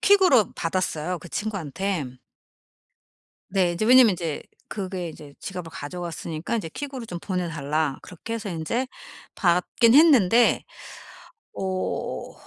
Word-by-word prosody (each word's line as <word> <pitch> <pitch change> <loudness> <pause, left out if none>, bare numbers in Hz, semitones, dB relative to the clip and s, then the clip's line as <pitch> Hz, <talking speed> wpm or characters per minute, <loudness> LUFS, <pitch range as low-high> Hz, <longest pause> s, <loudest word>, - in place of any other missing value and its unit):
퀵으로 370 - +5
받았어요 175 0 -2
그 175 - -11
친구한테. 175 -9 -3 1.3
네. 185 -3 +2
인제 175 +5 -1
왜냐하면 250 -1 +8
인제 165 -4 -3 0.3
그게 185 -4 -4
이제 145 -2 -11
지갑을 180 -3 -6
가져갔으니까 165 +3 -5
인제 195 -8 -2
퀵으로 270 - -6
좀 175 -5 -6
보내달라. 155 -6 -2
그렇게 200 +6 -7
해서 220 -2 -4
인제 180 +10 -2 0.5
받긴 180 +6 +3
했는데 245 - +6 0.9
어 185 -1 -3
180 Hz, 275 characters per minute, -25 LUFS, 165-225 Hz, 1.3 s, 왜냐하면